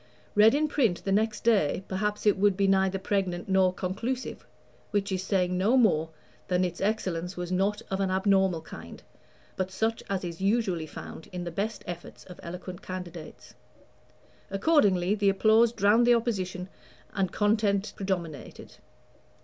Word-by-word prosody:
Read 215 +3 +6
in 305 +1 +2
print 240 -12 +1
the 195 - -2
next 215 +1 +1
day, 195 -6 +2
perhaps 210 +3 -2
it 210 - +5
would 200 -1 +2
be 200 - +2
neither 190 0 +2
pregnant 190 -2 -2
nor 190 -1 +3
conclusive, 210 +8 -4 0.4
which 205 -1 -1
is 185 -1 -1
saying 185 -2 0
no 205 +8 +3
more 165 -10 +3 0.4
than 180 0 +1
that 180 - +1
its 175 - -12
excellence 185 -4 -2
was 175 0 -4
not 195 +3 0
of 190 - -1
an 195 -1 +1
abnormal 190 -2 +2
kind, 85 - -11 0.5
but 185 0 -2
such 220 +4 -1
as 195 -1 -1
is 170 0 -6
usually 195 -6 0
found 160 - -9
in 180 -1 -5
the 170 - -5
best 210 +5 -3
efforts 175 -1 -8
of 180 - -13
eloquent 180 +1 -8
candidates. 180 -3 -8 1.0
Accordingly, 195 - +3
the 205 -1 +2
applause 220 +3 +4
drowned 225 +2 +3
the 240 - +7
opposition, 190 -6 -2 0.5
and 190 -3 0
content 205 -1 +1
predominated. 175 -7 -5
195 Hz, 155 wpm, -28 LUFS, 180-210 Hz, 1.0 s, the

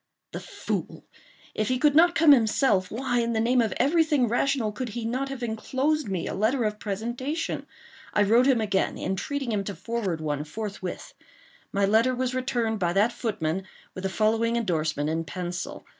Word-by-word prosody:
The - - -5
fool! - - -5 0.5
if 215 - -1
he 255 - +1
could 290 +2 +3
not 340 +3 +5
come 320 -2 +6
himself, 220 -6 +3
why, 245 +1 -1
in 235 0 0
the 220 - +1
name 245 +2 +3
of 225 - 0
every 325 +4 +4
thing 295 -6 +2
rational, 240 -1 +1
could 250 +3 -4
he 225 +1 -5
not 260 +4 -2
have 270 -2 -6
enclosed 265 +6 -1
me 185 -3 -2
a - - -3
letter 225 +6 +1
of 210 -1 -2
presentation? 240 - -3 0.4
I 205 - +3
wrote 230 +5 +4
him 260 -4 +4
again, 200 -3 0
entreating 245 +8 -3
him 205 -2 0
to 200 - -4
forward 220 -8 -3
one 150 -2 -2
forthwith. 195 +2 -6 0.6
My 200 0 +2
letter 225 +5 +3
was 255 0 -1
returned 245 -4 -1
by 175 -2 +1
that 205 +5 +3
footman, 185 -6 -2 0.3
with 185 - -7
the 190 - 0
following 225 +4 +1
endorsement 160 -9 0
in 160 +1 -1
pencil. 175 +2 -5
225 Hz, 185 wpm, -26 LUFS, 195-255 Hz, 0.6 s, come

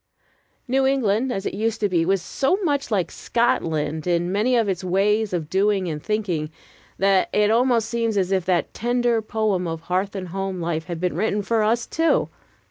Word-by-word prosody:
New 265 +1 +2
England 255 -2 +1
as 195 -4 -3
it - - -2
used 225 +2 -1
to 210 - +2
be 170 -4 +1
was 195 -2 +1
so 275 - 0
much 285 -4 0
like 195 -6 0
Scotland 160 - -1
in 175 0 +1
many 220 +6 +2
of 230 -3 +2
its 190 -2 -2
ways 205 +4 +1
of 170 -4 -2
doing 195 +1 +1
and 150 -3 -4
thinking, 185 -8 -2 0.5
that 195 -1 +3
it 210 0 +3
almost 235 -1 +2
seems 230 -2 -1
as 190 -1 +1
if 190 -2 +1
that 180 -2 0
tender 240 -1 +1
poem 215 -4 -1
of 165 -1 -4
hearth 185 +4 -2
and 185 -2 -5
home 195 0 -3
life 165 -1 -2
had 170 -2 -5
been 180 -2 -1
written 205 +2 0
for 225 +2 +1
us 230 +2 +1
too. 325 0 +1
200 Hz, 195 wpm, -23 LUFS, 180-230 Hz, 0.5 s, that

